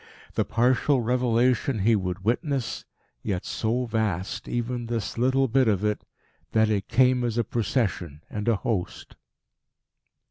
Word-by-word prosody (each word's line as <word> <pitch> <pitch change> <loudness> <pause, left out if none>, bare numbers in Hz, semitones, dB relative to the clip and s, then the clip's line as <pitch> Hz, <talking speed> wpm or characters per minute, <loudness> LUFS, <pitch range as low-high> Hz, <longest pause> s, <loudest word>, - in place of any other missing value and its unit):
The - - 0
partial 125 +3 +2
revelation 125 +1 +1
he 110 +3 +3
would 95 -1 -3
witness 130 +2 -1 0.4
yet 95 -4 -3
so 120 +3 -1
vast, 105 -5 -2
even 120 0 -3
this 115 -4 -3
little 130 +3 +2
bit 130 +1 +3
of 100 -2 +1
it, 105 -1 -1 0.5
that 110 -1 +3
it 100 -2 -1
came 125 -1 +3
as 120 -1 -1
a 120 - +3
Procession 100 - -2
and 105 0 -5
a 115 - +4
host. 100 -2 -3
115 Hz, 140 wpm, -26 LUFS, 105-125 Hz, 0.5 s, a